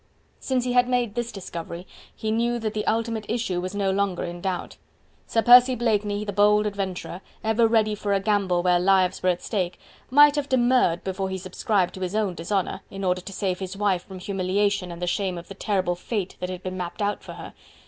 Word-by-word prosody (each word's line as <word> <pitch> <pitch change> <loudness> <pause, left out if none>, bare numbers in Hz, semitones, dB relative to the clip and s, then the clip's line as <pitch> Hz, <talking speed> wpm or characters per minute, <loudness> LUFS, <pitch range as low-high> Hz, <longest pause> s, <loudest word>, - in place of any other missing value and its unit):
Since 255 -2 -1
he 250 - -1
had 245 0 +4
made 245 -4 +1
this 240 0 -3
discovery 170 -2 -7 0.3
he 220 - -3
knew 235 +2 +1
that 220 -2 -3
the 215 -1 -3
ultimate 225 -1 -1
issue 220 -6 -1
was 185 +2 -5
no 200 -1 +1
longer 195 -2 0
in 175 0 -6
doubt. 185 -1 -3 0.5
Sir 225 - +1
Percy 250 +1 +8
Blakeney, 210 -3 0
the 205 - -4
bold 210 +1 +4
adventurer, 195 -3 -4 0.2
ever 225 +1 +3
ready 220 -1 +2
for 205 -1 -3
a 200 - +3
gamble 195 -3 +1
where 180 -1 +4
lives 185 0 +3
were 185 - +2
at 180 -1 -1
stake, 185 -5 -2 0.3
might 290 +2 +7
have 290 0 -2
demurred 245 -8 +3
before 190 0 -3
he 190 - -3
subscribed 185 0 -1
to 190 - -9
his 185 +2 -3
own 210 -4 0
dishonour, 190 +3 -2
in 195 0 -7
order 180 -1 +1
to 195 - -9
save 185 -1 -2
his 190 0 -6
wife 195 -4 +1
from 190 - -9
humiliation 195 0 -1
and 170 +1 -7
the - - +2
shame 185 0 -1
of 170 - -10
the - - -6
terrible 190 -3 0
fate 190 +1 -4
that 180 - -3
had 180 -1 -6
been 185 0 -4
mapped 180 +3 -4
out 205 0 -1
for - - -9
her. - - -9
200 Hz, 220 wpm, -25 LUFS, 185-220 Hz, 0.5 s, Percy